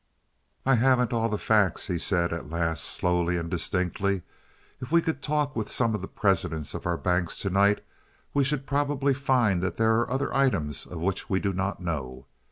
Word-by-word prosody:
"I 135 - +4
haven't 125 0 +3
all 115 -1 +1
the 105 - -1
facts," 105 -4 +2
he 90 -4 -2
said, 85 -1 +1
at 85 -3 -6
last, 80 -1 -1
slowly 90 0 0
and 85 0 -4
distinctly. 90 +1 -1 0.6
"If 125 +1 -7
we 170 - +6
could 160 -3 -2
talk 150 -1 0
with 110 -2 -2
some 115 -3 +1
of 105 - -2
the 95 - -5
presidents 85 -6 0
of - - -5
our 85 -1 0
banks 90 -1 0
to 100 - -2
night, 100 +2 +3 0.5
we 140 - +3
should 135 0 -1
probably 140 -1 +1
find 125 -9 +2
that 95 - -2
there 110 0 +3
are 120 - -1
other 135 +2 -1
items 80 - 0
of 85 -3 -7
which 95 +2 -2
we 95 - +2
do 100 0 -1
not 95 +1 -2
know. 65 -6 -4
100 Hz, 195 wpm, -27 LUFS, 85-130 Hz, 0.6 s, we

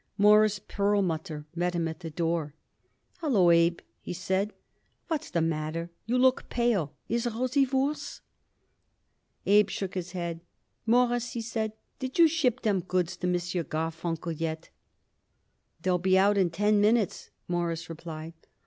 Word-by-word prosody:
Morris 210 0 +5
Perlmutter 180 -7 -1
met 175 +1 -1
him 170 -1 0
at 160 - -6
the 165 -2 -6
door. 165 -2 -2 0.6
"Hallo, 215 - +4
Abe," 170 0 +3 0.2
he - - -6
cried. 190 +3 -1 0.6
"What's 315 -1 -2
the 170 - 0
matter? 165 +1 -2 0.2
You 245 +2 +1
look 260 0 +3
pale. 210 - 0
Is 235 +1 0
Rosie 255 +4 +1
worse?" 270 +3 -1 1.2
Abe 205 0 +5
shook 195 -1 -4
his 180 -1 -5
head. 170 -2 -4 0.5
"Mawruss," 245 0 +2
he 235 - -3
said, 220 -1 -2 0.3
"did 260 -1 -4
you 335 -1 +8
ship 275 -7 +1
them 205 -4 +2
goods 185 0 -1
to 180 - -2
M. 180 - +2
Garfunkel 165 -1 -3
yet?" 160 0 -4 1.1
"They'll 180 -1 +2
be 185 +1 +3
out 200 +2 +4
in 190 -3 +3
ten 205 +4 +2
minutes," 215 0 +2 0.2
Morris 170 -1 -2
replied. 165 0 -7
185 Hz, 140 wpm, -28 LUFS, 165-225 Hz, 1.2 s, you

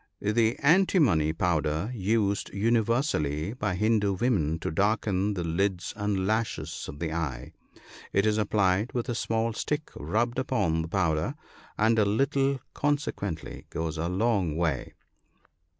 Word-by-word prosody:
The 110 +3 +2
antimony 145 - +4
powder 80 +3 0
used 100 -2 0
universally 105 - +1
by 125 -7 -2
Hindoo 105 0 +2
women 90 - +1
to - - -2
darken 100 +1 +1
the 90 - -2
lids 90 +2 -1
and 105 -3 -1
lashes 110 +2 -2
of 70 - -8
the 80 0 -3
eye. 70 -7 -4 0.6
It 100 +1 +2
is 110 0 +2
applied 100 +1 +1
with 125 +1 -2
a - - 0
small 115 -1 -1
stick 150 +6 -3
rubbed 115 - -1
upon 85 -11 0
the 80 - -4
powder, 85 - 0 0.4
and 110 +1 +3
a 105 - +4
little 135 +5 +1
consequently 140 - -2
goes 80 -1 -3
a 85 +2 -1
long 95 -5 +1
way. 80 -6 -1
100 Hz, 135 wpm, -28 LUFS, 85-115 Hz, 0.6 s, antimony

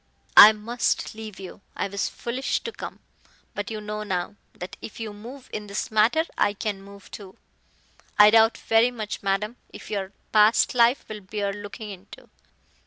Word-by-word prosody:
"I 210 - +12
must 225 +3 -2
leave 215 -2 -9
you. 190 0 -10
I - - -2
was 200 0 -2
foolish 250 +3 -3
to 460 - -5
come. - - -9 0.5
But 205 -1 -4
you 220 -1 -5
know 210 0 -5
now, 190 -1 -3 0.2
that 180 - -8
if 220 - -9
you 220 -2 -5
move 245 +6 -11
in 210 -1 -5
this 200 +2 -4
matter 220 +9 +3 0.2
I 205 - +3
can 205 -1 -4
move 200 0 -14
too. 195 -2 -11 0.8
I 210 0 +8
doubt 225 0 +5
very 225 +2 +3
much, 215 -4 -6
madam, 205 +4 -1
if - - -11
your 195 -2 -3 0.2
past 215 +1 +4
life 240 +1 +3
will 215 -1 -7
bear 200 +1 -3
looking 205 +1 -8
into." 190 +1 -13
210 Hz, 175 wpm, -25 LUFS, 200-225 Hz, 0.8 s, I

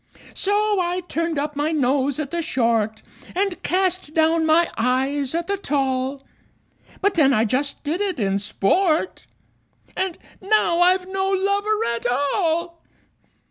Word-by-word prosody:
So 415 0 +1
I 355 +1 -1
turned 335 -1 -2
up 295 +1 -2
my 295 +2 0
nose 275 -2 +1
at 290 -3 -4
the 340 0 -1
short, 230 -8 0 0.3
And 385 -1 -1
cast 370 -4 -1
down 320 0 +3
my 330 +2 +3
eyes 265 +4 0
at 340 0 -1
the 400 +2 -1
tall; 270 -4 -2 0.8
But 405 0 +2
then 275 -5 +4
I 220 -1 +3
just 270 +6 -2
did 315 +6 -2
it 385 -7 -2
in 195 -2 0
sport 310 - 0 0.7
And 375 -3 -2 0.2
now 390 -4 +2
I've 365 +1 +3
no 385 0 -1
lover 400 +3 +1
at 235 +1 -3
all! 330 +6 -1
320 Hz, 140 wpm, -22 LUFS, 270-370 Hz, 0.8 s, then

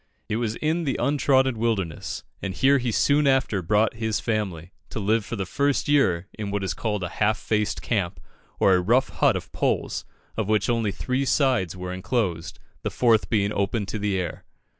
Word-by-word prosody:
It 110 - -1
was 115 -2 -1
in 160 +5 0
the 135 - 0
untrodden 130 -2 +2
wilderness, 100 -8 -2 0.2
and 95 -2 -4
here 135 +9 +4
he 120 -2 -1
soon 145 +6 +3
after 130 -7 +2
brought 105 +5 +2
his 110 -1 -1
family, 95 -7 -3 0.2
to - - -5
live 110 +2 +1
for 120 - -5
the 95 -3 -3
first 140 +8 0
year 95 -12 +2
in 105 -2 -5
what 100 0 -2
is 95 -3 -1
called 105 +1 -2
a 85 - -2
half 105 +1 +3
faced 105 -1 -1
camp, 100 -7 -1 0.4
or 95 - +5
a 90 - +3
rough 120 +8 +2
hut - - +2
of - - -5
poles, - - -1 0.3
of 110 -2 -2
which 110 +2 +2
only 115 -3 0
three 130 +6 -1
sides 130 - +1
were 90 0 -5
enclosed, 95 -3 -2 0.2
the - - -2
fourth 115 -3 +2
being 105 -3 +1
open 100 +2 0
to 110 - -4
the 100 -1 0
air. 90 - -4
110 Hz, 195 wpm, -25 LUFS, 95-125 Hz, 0.4 s, or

